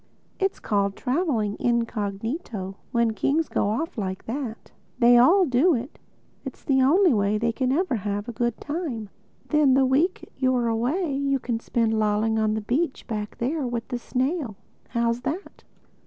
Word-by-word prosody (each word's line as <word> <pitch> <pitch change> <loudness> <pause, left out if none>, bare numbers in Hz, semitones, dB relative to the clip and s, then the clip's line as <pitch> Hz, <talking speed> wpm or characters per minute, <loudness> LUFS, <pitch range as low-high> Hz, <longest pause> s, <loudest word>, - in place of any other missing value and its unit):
It's 390 -1 0
called 200 -1 0
traveling 250 - 0
incognito, 225 - -2 0.2
when 235 -2 +2
kings 305 +8 +1
go 200 - 0
off 265 +4 -2
like 190 -2 -4
that. 235 -2 -5 0.3
They 245 -1 +6
all 365 +10 +6
do 290 +5 +3
it—It's 250 +6 -10
the 265 -2 +2
only 335 +5 +5
way 205 -1 +1
they 230 +2 +1
can 255 +2 -1
ever 300 -3 +1
have 205 +1 -3
a - - -3
good 240 0 -2
time. 290 - -4 0.4
Then 300 -4 +4
the 270 0 +4
week 295 +8 +1
you're 255 -2 +1
away 275 +9 0
you 275 0 +1
can 240 -3 -3
spend 225 -1 0
lolling 215 +1 +1
on 215 0 +1
the 220 - -2
beach 265 +8 -1
back 210 -3 -5
there 275 +3 -1
with 235 -1 -4
the 245 - -3
snail. 260 - -2 0.3
How's 235 0 0
that?" 340 +10 -5
240 Hz, 160 wpm, -25 LUFS, 220-280 Hz, 0.4 s, They